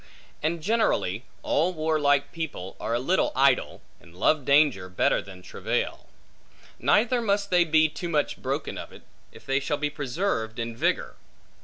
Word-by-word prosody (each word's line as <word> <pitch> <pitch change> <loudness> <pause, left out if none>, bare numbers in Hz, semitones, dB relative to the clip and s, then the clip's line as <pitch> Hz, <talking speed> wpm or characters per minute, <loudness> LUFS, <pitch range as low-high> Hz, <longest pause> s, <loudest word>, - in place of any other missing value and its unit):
And 160 +1 -1
generally, 160 - +1 0.2
all 175 +4 +1
warlike 145 -3 +1
people 145 - -6
are 115 - -1
a - - +1
little 175 +9 +1
idle, 135 0 +2 0.2
and 85 0 -18
love 145 +7 +2
danger 140 -10 +3
better 90 - +1
than 95 -2 -12
travail. - - -3 0.7
Neither 240 +3 +3
must 200 -2 0
they 175 -1 +5
be 155 0 +4
too 170 +3 -6
much 150 -3 -1
broken - - -3
of - - -8
it, - - -14 0.3
if - - -15
they 135 0 +1
shall 145 +1 -2
be 150 0 -2
preserved 140 - -2
in 115 -1 -4
vigor. - - -1
145 Hz, 160 wpm, -26 LUFS, 120-170 Hz, 0.7 s, they